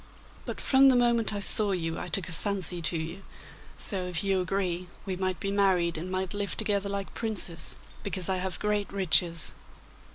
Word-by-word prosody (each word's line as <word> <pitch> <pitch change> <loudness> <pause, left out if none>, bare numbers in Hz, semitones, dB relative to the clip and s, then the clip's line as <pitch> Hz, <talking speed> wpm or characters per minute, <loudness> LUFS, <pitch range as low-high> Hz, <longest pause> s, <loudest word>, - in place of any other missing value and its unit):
But - - -5
from 270 0 +5
the 260 - +5
moment 235 -2 +3
I 205 - -3
saw 205 0 +2
you 165 -2 -3
I - - -5
took 190 -4 0
a - - -7
fancy 180 -1 0
to 165 +1 -1
you, 165 +4 -5 0.6
so 185 -4 -1
if 175 -1 -2
you 195 -1 +1
agree, 180 -1 -2 0.2
we 190 -2 -3
might 185 -2 -2
be 195 - -2
married 185 -4 +2
and 170 +4 -5
might 185 -1 -2
live 205 -3 -3
together 200 -1 0
like 200 -1 -4
princes, 210 -7 +3 0.2
because 190 -3 -1
I 190 -1 +1
have 185 0 -3
great 210 -1 -1
riches. 175 -3 +2
190 Hz, 190 wpm, -28 LUFS, 175-200 Hz, 0.6 s, from